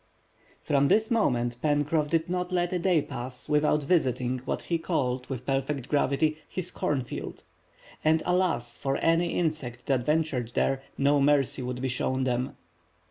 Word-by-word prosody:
From 140 Hz, -1 st, +3 dB
this 220 Hz, -, +3 dB
moment 120 Hz, -, +1 dB
Pencroff 150 Hz, 0 st, +1 dB
did 165 Hz, 0 st, +1 dB
not 180 Hz, 0 st, -2 dB
let 175 Hz, 0 st, 0 dB
a 180 Hz, -, 0 dB
day 170 Hz, -4 st, +2 dB
pass 125 Hz, -1 st, -6 dB
without 150 Hz, 0 st, +2 dB
visiting 130 Hz, -6 st, +1 dB
what -, -, -2 dB
he 170 Hz, -1 st, -1 dB
called 130 Hz, -7 st, -1 dB
with 130 Hz, -2 st, -5 dB
perfect 135 Hz, 0 st, -2 dB
gravity, 150 Hz, +2 st, +1 dB
his 180 Hz, -1 st, -3 dB
"corn 145 Hz, -3 st, -1 dB
field." 125 Hz, -, -7 dB, 0.6 s
And 155 Hz, +1 st, +3 dB
alas, 180 Hz, -10 st, 0 dB
for 135 Hz, 0 st, -1 dB
any 165 Hz, +1 st, +2 dB
insects 150 Hz, -8 st, -2 dB
that 130 Hz, -3 st, +1 dB
ventured 140 Hz, -5 st, 0 dB
there, 135 Hz, 0 st, +1 dB, 0.2 s
no 140 Hz, +1 st, +3 dB
mercy 140 Hz, -2 st, +3 dB
would 125 Hz, 0 st, -4 dB
be -, -, +1 dB
shown 130 Hz, +1 st, -1 dB
them. 125 Hz, 0 st, -1 dB
145 Hz, 160 wpm, -27 LUFS, 130-160 Hz, 0.6 s, From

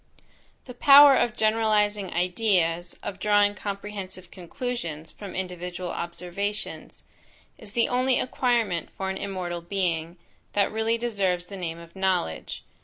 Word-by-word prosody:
The 250 Hz, -, -9 dB
power 280 Hz, +2 st, +9 dB
of 235 Hz, -4 st, +1 dB
generalizing 210 Hz, -3 st, +2 dB
ideas, 175 Hz, -2 st, +1 dB
of 195 Hz, -, -5 dB
drawing 205 Hz, 0 st, +3 dB
comprehensive 200 Hz, -2 st, -6 dB
conclusions 175 Hz, -, -5 dB
from 200 Hz, -2 st, -9 dB
individual 180 Hz, -1 st, -4 dB
observations, 180 Hz, +4 st, -5 dB, 0.6 s
is 200 Hz, -, -12 dB
the 235 Hz, -, +2 dB
only 255 Hz, +1 st, +2 dB
acquirement 235 Hz, -8 st, 0 dB
for 190 Hz, 0 st, -2 dB
an 190 Hz, -, -4 dB
immortal 180 Hz, -3 st, -4 dB
being, 170 Hz, -2 st, -2 dB, 0.4 s
that 200 Hz, -1 st, +2 dB
really 220 Hz, +1 st, 0 dB
deserves 195 Hz, -7 st, 0 dB
the 195 Hz, -, -9 dB
name 165 Hz, -3 st, -4 dB
of 170 Hz, +1 st, -13 dB
knowledge. 185 Hz, -, -1 dB
195 Hz, 125 wpm, -26 LUFS, 175-215 Hz, 0.6 s, power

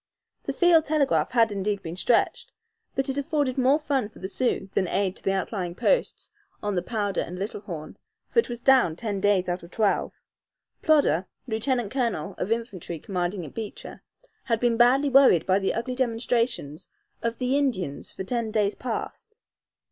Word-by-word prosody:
The -, -, -2 dB
field 340 Hz, -3 st, +5 dB
telegraph 275 Hz, -, +2 dB
had 230 Hz, -3 st, +3 dB
indeed 200 Hz, 0 st, -2 dB
been 165 Hz, +1 st, -5 dB
stretched, 230 Hz, +5 st, +1 dB, 0.4 s
but 270 Hz, -, 0 dB
it 270 Hz, +1 st, -1 dB
afforded 280 Hz, -2 st, 0 dB
more 265 Hz, +2 st, +4 dB
fun 280 Hz, -8 st, -1 dB
for -, -, -18 dB
the 190 Hz, -, -5 dB
Sioux 220 Hz, -1 st, -1 dB
than 190 Hz, -, +1 dB
aid 190 Hz, 0 st, 0 dB
to -, -, -11 dB
the 195 Hz, -, +1 dB
outlying 190 Hz, -2 st, -3 dB
posts -, -, 0 dB, 0.3 s
on 205 Hz, 0 st, -1 dB
the 180 Hz, -, 0 dB
Powder 205 Hz, -4 st, -1 dB
and 180 Hz, -, -6 dB
Little 200 Hz, +1 st, -4 dB
Horn, 160 Hz, -7 st, -8 dB, 0.3 s
for -, -, +2 dB
it 460 Hz, -, +1 dB
was 240 Hz, 0 st, -5 dB
down 260 Hz, -12 st, +4 dB
ten 205 Hz, +1 st, -3 dB
days 200 Hz, -2 st, +2 dB
out 175 Hz, 0 st, -2 dB
of 170 Hz, -, -12 dB
twelve. 210 Hz, +1 st, +1 dB, 0.7 s
Plodder, 280 Hz, -, +3 dB, 0.2 s
lieutenant 235 Hz, -1 st, -1 dB
colonel 235 Hz, -, -1 dB
of 195 Hz, -, -2 dB
infantry 215 Hz, -7 st, -3 dB
commanding 180 Hz, +1 st, -3 dB
at 150 Hz, -, -11 dB
Beecher, 220 Hz, -3 st, -7 dB, 0.4 s
had 230 Hz, -4 st, +1 dB
been 240 Hz, -1 st, +2 dB
badly 260 Hz, +4 st, +4 dB
worried 260 Hz, -, +6 dB
by 190 Hz, +1 st, +3 dB
the 195 Hz, -, -1 dB
ugly 245 Hz, +3 st, -2 dB
demonstrations 235 Hz, -, -1 dB, 0.3 s
of 230 Hz, 0 st, -2 dB
the 255 Hz, +1 st, 0 dB
Indians 210 Hz, -, -1 dB
for -, -, -6 dB
ten 230 Hz, +2 st, -2 dB
days 210 Hz, -1 st, +1 dB
past. 255 Hz, -, -6 dB
225 Hz, 180 wpm, -26 LUFS, 190-255 Hz, 0.7 s, worried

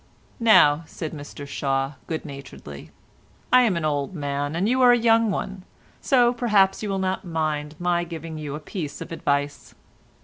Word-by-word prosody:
"Now," 165 Hz, -10 st, +6 dB
said 160 Hz, -1 st, -6 dB
Mr 145 Hz, -1 st, -8 dB
Shaw 135 Hz, 0 st, -1 dB
good 160 Hz, -1 st, -4 dB
naturedly, 135 Hz, -, -10 dB, 0.6 s
"I 255 Hz, -, +8 dB
am 215 Hz, -8 st, +2 dB
an 165 Hz, -, -2 dB
old 145 Hz, +3 st, -1 dB
man 145 Hz, 0 st, -3 dB
and 185 Hz, +5 st, 0 dB
you 255 Hz, +3 st, +2 dB
are 250 Hz, -1 st, +7 dB
a 245 Hz, -, +5 dB
young 230 Hz, -1 st, +3 dB
one, 195 Hz, 0 st, -3 dB, 0.4 s
so 245 Hz, -3 st, +4 dB
perhaps 210 Hz, -6 st, +2 dB
you'll 200 Hz, -2 st, -2 dB
not 190 Hz, +1 st, -2 dB
mind 155 Hz, -3 st, -2 dB
my 175 Hz, 0 st, 0 dB
giving 165 Hz, -2 st, -7 dB
you 145 Hz, -2 st, -5 dB
a -, -, -5 dB
piece 150 Hz, -2 st, -6 dB
of -, -, -7 dB
advice. 145 Hz, -3 st, -2 dB
165 Hz, 170 wpm, -24 LUFS, 145-200 Hz, 0.6 s, I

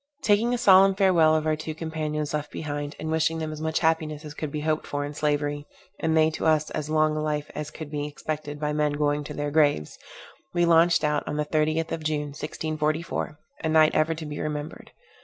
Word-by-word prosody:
Taking 210 Hz, +3 st, +3 dB
a 245 Hz, -, +1 dB
solemn 195 Hz, -3 st, +6 dB
farewell 175 Hz, -5 st, +4 dB
of 155 Hz, 0 st, 0 dB
our 155 Hz, 0 st, +2 dB
two 155 Hz, 0 st, -6 dB
companions 155 Hz, -2 st, -3 dB
left 150 Hz, -1 st, -2 dB
behind, 145 Hz, -1 st, -4 dB
and 160 Hz, -, -3 dB
wishing 160 Hz, 0 st, +1 dB
them 160 Hz, -1 st, -3 dB
as 155 Hz, 0 st, -7 dB
much 160 Hz, 0 st, -1 dB
happiness 160 Hz, -2 st, 0 dB
as 150 Hz, -, -7 dB
could 150 Hz, -1 st, -5 dB
be 150 Hz, -, -3 dB
hoped 155 Hz, 0 st, -1 dB
for 145 Hz, 0 st, -2 dB
in 145 Hz, -, -6 dB
slavery, 145 Hz, -1 st, -1 dB, 0.3 s
and 160 Hz, 0 st, +1 dB
they 160 Hz, 0 st, +4 dB
to 160 Hz, -, -2 dB
us 155 Hz, -1 st, +2 dB
as 150 Hz, 0 st, -4 dB
long 155 Hz, 0 st, +3 dB
life 150 Hz, -1 st, -2 dB
as 150 Hz, 0 st, -5 dB
could 155 Hz, -1 st, -9 dB
be 145 Hz, -1 st, -2 dB
expected 150 Hz, 0 st, -5 dB
by 150 Hz, 0 st, -1 dB
men 150 Hz, -1 st, +1 dB
going 145 Hz, 0 st, 0 dB
to -, -, -7 dB
their 145 Hz, 0 st, -2 dB
graves, 145 Hz, -, +2 dB, 0.6 s
we 175 Hz, 0 st, +3 dB
launched 170 Hz, 0 st, +4 dB
out 150 Hz, -1 st, +1 dB
on 150 Hz, -, -3 dB
the 150 Hz, -, 0 dB
30th 155 Hz, +1 st, 0 dB
of 160 Hz, -, -3 dB
June 150 Hz, -1 st, -1 dB
1644, 155 Hz, +1 st, -3 dB, 0.3 s
a 160 Hz, -, 0 dB
night 155 Hz, -1 st, +5 dB
ever 160 Hz, +1 st, +2 dB
to 160 Hz, 0 st, -7 dB
be 150 Hz, 0 st, -6 dB
remembered. 150 Hz, 0 st, -5 dB
155 Hz, 215 wpm, -26 LUFS, 150-160 Hz, 0.6 s, solemn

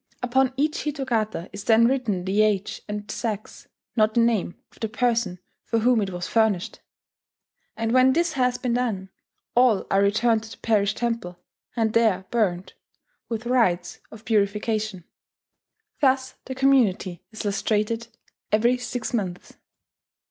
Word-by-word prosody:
Upon 260 Hz, +1 st, +2 dB
each 300 Hz, +2 st, 0 dB
hitogata 235 Hz, -, -2 dB
is 200 Hz, 0 st, -7 dB
then 225 Hz, 0 st, +5 dB
written 230 Hz, -8 st, 0 dB
the 195 Hz, +3 st, +2 dB
age 210 Hz, -2 st, 0 dB
and 210 Hz, 0 st, -5 dB
sex 215 Hz, -3 st, -5 dB, 0.3 s
(not 215 Hz, -1 st, +2 dB
the -, -, +4 dB
name) 230 Hz, -6 st, +1 dB
of -, -, -22 dB
the 220 Hz, -, -2 dB
person 235 Hz, -5 st, 0 dB, 0.3 s
for 230 Hz, -, -1 dB
whom 235 Hz, 0 st, +3 dB
it 200 Hz, -, -1 dB
was 180 Hz, -1 st, -5 dB
furnished; 220 Hz, -6 st, +1 dB, 1.0 s
and 225 Hz, 0 st, -1 dB
when 255 Hz, +1 st, +5 dB
this 340 Hz, +1 st, +1 dB
has 250 Hz, -3 st, +1 dB
been 250 Hz, -2 st, -1 dB
done, 215 Hz, -6 st, -2 dB, 0.4 s
all 240 Hz, -5 st, +4 dB
are 195 Hz, -, +4 dB
returned 220 Hz, +3 st, +2 dB
to 220 Hz, -, -11 dB
the -, -, -11 dB
parish 210 Hz, -2 st, +1 dB
temple, 230 Hz, -7 st, -3 dB, 0.4 s
and 225 Hz, -2 st, +1 dB
there 215 Hz, -5 st, +2 dB
burnt, 190 Hz, -6 st, 0 dB, 0.6 s
with 230 Hz, 0 st, -4 dB
rites 185 Hz, -8 st, +1 dB
of 220 Hz, 0 st, -13 dB
purification. 210 Hz, -2 st, 0 dB, 1.0 s
Thus 260 Hz, -2 st, +2 dB
the 260 Hz, -, -5 dB
community 240 Hz, -10 st, +2 dB
is 220 Hz, -, -7 dB
"lustrated" 215 Hz, +3 st, 0 dB, 0.4 s
every 235 Hz, +4 st, +3 dB
six 245 Hz, -1 st, -4 dB
Months. 185 Hz, -6 st, -3 dB
225 Hz, 145 wpm, -24 LUFS, 200-245 Hz, 1.0 s, then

